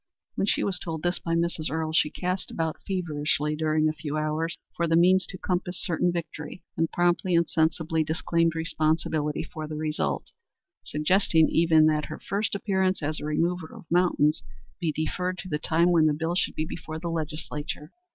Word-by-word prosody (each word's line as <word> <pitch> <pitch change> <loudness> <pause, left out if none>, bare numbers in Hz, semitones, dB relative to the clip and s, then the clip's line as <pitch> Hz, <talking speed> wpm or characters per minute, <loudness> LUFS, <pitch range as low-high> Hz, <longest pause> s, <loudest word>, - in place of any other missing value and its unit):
When 195 - -1
she - - +2
was 190 -4 0
told 160 -2 -5
this 175 +1 0
by 165 0 -1
Mrs. 170 -2 0
Earle, 160 0 -2
she 155 - +4
cast 180 +3 -2
about 160 -1 -2
feverishly 150 -5 0
during 155 0 +2
a 155 - +1
few 150 0 -4
hours 155 +2 -1 0.2
for 170 - 0
the 165 - +3
means 185 +2 +5
to - - -5
compass 180 0 -2
certain 175 0 +1
victory, 170 -1 -6
then 165 - +1
promptly 175 +1 +2
and 170 -1 +3
sensibly 160 0 +1
disclaimed 165 +1 +1
responsibility 155 -2 0
for 155 -1 -7
the 155 - -5
result, 150 - -2 0.5
suggesting 160 +1 +3
even 160 -2 +5
that 155 -1 +2
her - - -6
first 205 +2 -1
appearance 190 -3 0
as 155 +2 -1
a - - -6
remover 165 +2 0
of - - -12
mountains 170 -4 +3 0.4
be 170 -3 0
deferred 180 +4 -2
to 185 +1 -7
the 150 - -1
time 170 +3 +3
when 160 -2 +5
the 150 - +2
bill 165 +3 -1
should 180 - 0
be 155 - -1
before 160 -1 -6
the 170 +2 -5
Legislature. 155 -1 -4
160 Hz, 185 wpm, -27 LUFS, 155-175 Hz, 0.5 s, means